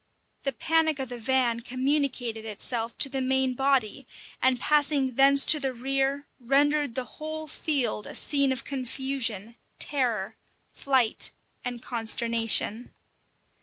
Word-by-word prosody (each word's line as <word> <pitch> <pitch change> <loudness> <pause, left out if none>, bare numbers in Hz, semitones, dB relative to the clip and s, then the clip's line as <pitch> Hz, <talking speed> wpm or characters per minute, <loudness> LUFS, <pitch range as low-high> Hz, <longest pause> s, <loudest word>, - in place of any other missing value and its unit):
The 275 - -1
panic 320 +4 +1
of 265 -3 -4
the 245 -1 -6
van 245 -1 +1
communicated 255 -2 -1
itself 225 +2 -3
to - - +7
the 270 0 -3
main 265 0 +1
body, 265 -1 0 0.3
and 255 -1 +3
passing 290 -2 +2
thence 275 +2 +5
to 305 - +5
the 270 -2 -2
rear, 270 +3 -1
rendered 285 +1 +1
the 255 - -1
whole 315 +2 -6
field 270 -8 -2
a - - -7
scene 280 -2 +3
of 260 - -3
confusion, 255 -5 -3 0.2
terror, 240 -9 -2 0.4
flight, 260 -5 +1 0.3
and 245 -1 -5
consternation. 230 -1 -1
265 Hz, 130 wpm, -27 LUFS, 235-280 Hz, 0.4 s, to